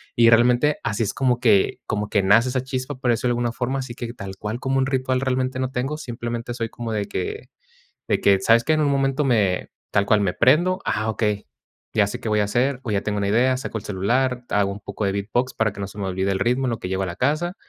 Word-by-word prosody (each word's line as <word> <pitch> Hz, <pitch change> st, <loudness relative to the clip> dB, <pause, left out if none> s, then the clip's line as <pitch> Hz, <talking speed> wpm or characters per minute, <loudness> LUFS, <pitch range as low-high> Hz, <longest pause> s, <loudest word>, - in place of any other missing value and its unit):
Y 115 Hz, -1 st, +6 dB
realmente, 120 Hz, +5 st, +4 dB
así 110 Hz, +2 st, -1 dB
es 105 Hz, -, -2 dB
como 125 Hz, 0 st, +1 dB
que 105 Hz, -6 st, +3 dB
como 105 Hz, -1 st, -1 dB
que 100 Hz, -, +2 dB
nace 115 Hz, +6 st, +5 dB
esa 130 Hz, 0 st, -1 dB
chispa, 130 Hz, +1 st, -4 dB
por 125 Hz, -2 st, 0 dB
decirlo 120 Hz, +2 st, 0 dB
de -, -, -2 dB
alguna 120 Hz, -1 st, 0 dB
forma. 130 Hz, +3 st, -2 dB
Así 125 Hz, -3 st, -6 dB
que 120 Hz, -2 st, -6 dB
tal 95 Hz, -4 st, -8 dB
cual 110 Hz, +4 st, -4 dB
como 135 Hz, 0 st, 0 dB
un 130 Hz, -, +2 dB
ritual 130 Hz, -1 st, 0 dB
realmente, 130 Hz, -1 st, -1 dB
no 130 Hz, -1 st, -1 dB
tengo, 135 Hz, +5 st, -2 dB
simplemente 120 Hz, -3 st, -5 dB
soy 115 Hz, -2 st, -3 dB
como 115 Hz, -2 st, -5 dB
de 105 Hz, -1 st, -2 dB
que 430 Hz, +1 st, -4 dB, 0.6 s
de -, -, +1 dB
que, 100 Hz, -1 st, +4 dB
¿sabes 115 Hz, +4 st, +4 dB
qué?, 155 Hz, -, 0 dB
en 155 Hz, -, +1 dB
un 145 Hz, -, +2 dB
momento 135 Hz, +1 st, +1 dB
me 105 Hz, -8 st, +1 dB, 0.2 s
tal 100 Hz, -, +2 dB
cual 105 Hz, -1 st, +3 dB
me 95 Hz, -3 st, +1 dB
prendo, 175 Hz, +9 st, +3 dB
"ah, 110 Hz, +1 st, -1 dB
okey", 105 Hz, -, -1 dB, 0.5 s
ya 105 Hz, -2 st, +3 dB
sé 125 Hz, +4 st, -5 dB
qué 115 Hz, -, -3 dB
voy 105 Hz, 0 st, +2 dB
a 105 Hz, -, +2 dB
hacer, 125 Hz, +5 st, 0 dB
o 115 Hz, -, -3 dB
ya 100 Hz, -1 st, +1 dB
tengo 105 Hz, -1 st, -2 dB
una 100 Hz, -1 st, 0 dB
idea, 125 Hz, +5 st, +3 dB
saco 130 Hz, -, -5 dB
el 110 Hz, -, -7 dB
celular, 125 Hz, +6 st, 0 dB
hago 100 Hz, -1 st, +1 dB
un 100 Hz, -, -7 dB
poco 105 Hz, -, -6 dB
de 100 Hz, -, +1 dB
beatbox 115 Hz, +6 st, -1 dB
para 105 Hz, -3 st, 0 dB
que 100 Hz, -, -8 dB
no 100 Hz, -, -3 dB
se 100 Hz, -, -13 dB
me 100 Hz, -, -3 dB
olvide 95 Hz, +1 st, -1 dB
el 95 Hz, -, -1 dB
ritmo 125 Hz, +6 st, +1 dB
en -, -, +1 dB
lo 115 Hz, -, -2 dB
que -, -, -5 dB
llego 95 Hz, +1 st, -1 dB
a -, -, -1 dB
la 85 Hz, -1 st, -6 dB
casa, 155 Hz, +8 st, 0 dB
120 Hz, 270 wpm, -23 LUFS, 105-130 Hz, 0.6 s, Y